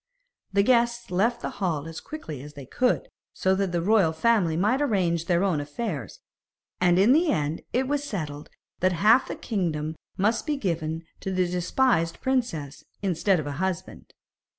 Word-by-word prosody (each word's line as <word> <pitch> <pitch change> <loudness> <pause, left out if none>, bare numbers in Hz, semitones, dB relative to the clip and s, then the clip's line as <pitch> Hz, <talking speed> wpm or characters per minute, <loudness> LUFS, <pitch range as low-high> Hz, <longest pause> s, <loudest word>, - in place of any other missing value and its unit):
The 200 0 +3
guests 235 -1 +2
left 230 +7 +1
the - - -2
hall 160 -5 -1
as 165 -1 -7
quickly 165 - -7
as 150 +1 -10
they 140 -2 -9
could, 250 - 0 0.3
so 190 - +1
that 190 -1 0
the 170 -1 -1
royal 195 -5 +4
family 180 -3 +2
might 215 +10 +2
arrange 180 - +1
their 175 0 +2
own 175 -7 +1
affairs, 145 - -5 0.6
and 175 -1 +4
in 205 +7 +6
the 320 +2 +3
end 150 +1 -1
it 255 +1 +1
was 290 +1 0
settled 155 - -5 0.3
that 185 0 +2
half 215 +9 +4
the - - -4
kingdom 160 -7 -2 0.2
must 215 +9 +1
be 295 -1 0
given 165 - -2 0.2
to - - -4
the 185 -1 +2
despised 180 0 +1
princess, 165 - -2 0.2
instead 190 0 +2
of 155 - -4
a 145 - -3
husband. 190 -2 -4
185 Hz, 175 wpm, -26 LUFS, 160-235 Hz, 0.6 s, in